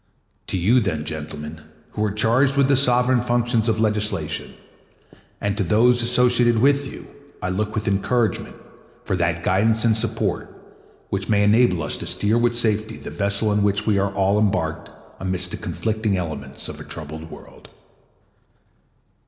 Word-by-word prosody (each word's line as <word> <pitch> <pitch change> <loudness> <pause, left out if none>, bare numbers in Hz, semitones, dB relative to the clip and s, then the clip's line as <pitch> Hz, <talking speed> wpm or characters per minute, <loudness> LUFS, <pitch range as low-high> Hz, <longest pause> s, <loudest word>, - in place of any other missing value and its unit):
To - - -2
you, 105 +9 +3
then, 80 -9 -2
gentlemen, 75 0 -7 0.3
who 105 - -2
are 105 - 0
charged 120 +7 +2
with 140 -1 +4
the 140 - +5
sovereign 125 -1 +3
functions 120 -1 0
of 110 -1 0
legislation, 105 -7 -2 0.8
and 100 0 -1
to 105 - +1
those 120 +6 +3
associated 120 0 +3
with 140 +2 +2
you, - - -10 0.3
I 90 - -3
look 105 +3 -2
with 110 -1 -2
encouragement 110 +3 0 0.5
for - - -1
that 85 -1 -1
guidance 110 +5 +2
and 110 -2 +4
support 110 -3 -2 0.6
which 95 0 -3
may 105 -1 +3
enable 105 -5 +3
us 75 - -2
to - - -6
steer 110 +3 +1
with 120 0 +1
safety 110 -2 0
the - - -9
vessel 100 +1 0
in 105 - +1
which 100 +1 0
we 105 -3 +2
are 100 0 0
all 100 +1 +2
embarked 100 -7 -1 0.3
amidst 90 -1 -3
the - - -3
conflicting 110 -3 -2
elements 80 -4 -6
of - - -8
a - - -8
troubled 80 0 -8
world. - - -14
105 Hz, 160 wpm, -22 LUFS, 95-120 Hz, 0.8 s, the